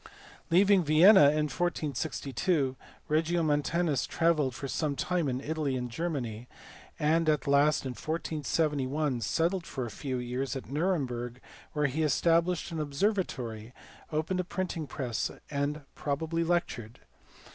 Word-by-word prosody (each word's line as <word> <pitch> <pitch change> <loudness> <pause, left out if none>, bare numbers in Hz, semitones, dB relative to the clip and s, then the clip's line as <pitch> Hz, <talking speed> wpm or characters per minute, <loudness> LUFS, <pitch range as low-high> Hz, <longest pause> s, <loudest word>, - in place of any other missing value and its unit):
Leaving 190 +2 +5
Vienna 160 +3 +7
in 150 +1 +3
1462, 150 -2 -1 0.3
Regiomontanus 155 -1 +1
travelled 155 -6 +1
for 140 - -5
some 145 +1 -1
time 170 +1 0
in 125 0 -1
Italy 150 -2 -2
and 125 -1 -3
Germany; 125 -7 -3 0.5
and 160 +2 +2
at 150 -2 +1
last 140 +1 +3
in 130 - -2
1471 150 -3 -1
settled 170 - 0
for 130 -3 -4
a 115 - -6
few 130 +1 -4
years 125 +1 -3
at 135 - -7
Nuremberg 130 -7 -1 0.3
where 150 -1 +1
he 145 +3 0
established 165 +3 +2
an 165 - -3
obser 150 +8 +1
vatory, 120 - -4 0.4
opened 160 +4 -1
a - - +1
printing 175 -3 -3
press^ 125 -4 -3
and 145 +1 -1
probably 160 +3 -2
lectured. 160 -10 -2
150 Hz, 130 wpm, -30 LUFS, 130-165 Hz, 0.5 s, Vienna